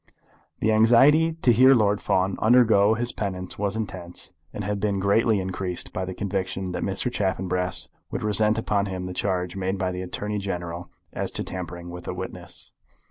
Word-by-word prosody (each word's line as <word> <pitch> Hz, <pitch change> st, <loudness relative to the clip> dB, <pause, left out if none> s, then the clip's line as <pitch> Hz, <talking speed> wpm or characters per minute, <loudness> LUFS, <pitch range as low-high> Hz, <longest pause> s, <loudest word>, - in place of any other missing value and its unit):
The 110 Hz, -, +3 dB
anxiety 135 Hz, +9 st, +5 dB
to 120 Hz, -, +6 dB
hear 130 Hz, +4 st, +7 dB
Lord 105 Hz, -3 st, +2 dB
Fawn 95 Hz, +1 st, +1 dB
undergo 110 Hz, -3 st, +5 dB
his 120 Hz, +2 st, -1 dB
penance 95 Hz, -3 st, -5 dB
was 100 Hz, 0 st, 0 dB
intense, 95 Hz, -4 st, -5 dB, 0.2 s
and 105 Hz, -, -5 dB
had 105 Hz, +1 st, -2 dB
been 100 Hz, -1 st, 0 dB
greatly 105 Hz, +2 st, +3 dB
increased 95 Hz, -1 st, -3 dB
by 95 Hz, -, -2 dB
the 95 Hz, 0 st, -6 dB
conviction 95 Hz, -1 st, -3 dB
that -, -, -3 dB
Mr. 95 Hz, +5 st, -1 dB
Chaffanbrass 90 Hz, -4 st, -1 dB, 0.2 s
would -, -, -4 dB
resent 105 Hz, +1 st, +2 dB
upon 100 Hz, -2 st, 0 dB
him 95 Hz, -1 st, -4 dB
the 90 Hz, -, -5 dB
charge 90 Hz, -1 st, -1 dB
made 95 Hz, 0 st, -1 dB
by 95 Hz, -1 st, -1 dB
the 90 Hz, 0 st, -4 dB
Attorney 105 Hz, +3 st, -3 dB
General 90 Hz, -3 st, -5 dB, 0.2 s
as -, -, -1 dB
to -, -, -1 dB
tampering 85 Hz, -1 st, -6 dB
with 90 Hz, 0 st, -9 dB
a -, -, -3 dB
witness. -, -, -7 dB
100 Hz, 180 wpm, -25 LUFS, 90-110 Hz, 0.2 s, hear